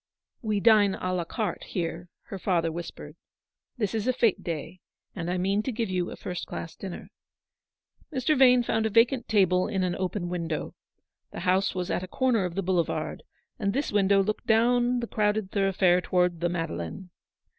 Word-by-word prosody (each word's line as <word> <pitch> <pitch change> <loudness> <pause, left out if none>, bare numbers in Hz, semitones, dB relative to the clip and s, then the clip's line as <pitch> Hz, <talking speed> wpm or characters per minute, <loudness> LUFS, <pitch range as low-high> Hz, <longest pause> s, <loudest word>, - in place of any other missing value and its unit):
" - - -53
We 205 - +2
dine 205 -2 +5
a 185 0 -3
la 175 -2 -1
carte 210 0 -3
here," 170 -1 -4 0.2
her 195 - -6
father 170 -4 +1
whis 170 +1 -5
pered: - - -11 0.6
"this 210 -5 -1
is 220 +1 -1
a 255 - +3
fete 230 -5 +2
day, 165 +2 -5 0.4
and 175 -3 -4
I 180 - 0
mean 195 +3 +1
to 260 - -3
give 225 -4 -2
you 180 -1 -1
a - - -7
first 180 -1 -5
class 165 - -6
dinner." 190 -3 -8 1.0
Mr. 275 +2 +1
Vane 250 -2 +6
found 225 -1 0
a - - -2
vacant 235 +3 +3
table 185 -4 +3
in 190 -2 -1
an 180 -1 0
open 185 -1 -2
window. 170 -3 -3 0.6
The - - -7
house 185 +2 +1
was 180 -1 -2
at - - 0
a 185 - -6
corner 235 -2 +1
of 175 -1 -5
the 195 - -1
boulevard, 175 -2 -1 0.4
and 200 -2 0
this 280 +4 -1
window 200 -1 +4
looked 215 +2 -3
down 240 +2 +3
the 235 - -3
crowded 210 -2 0
thoroughfare 190 -3 +3
towards 180 -2 +1
the 175 +1 0
Madeleine. 165 - -4
190 Hz, 190 wpm, -27 LUFS, 180-220 Hz, 1.0 s, Vane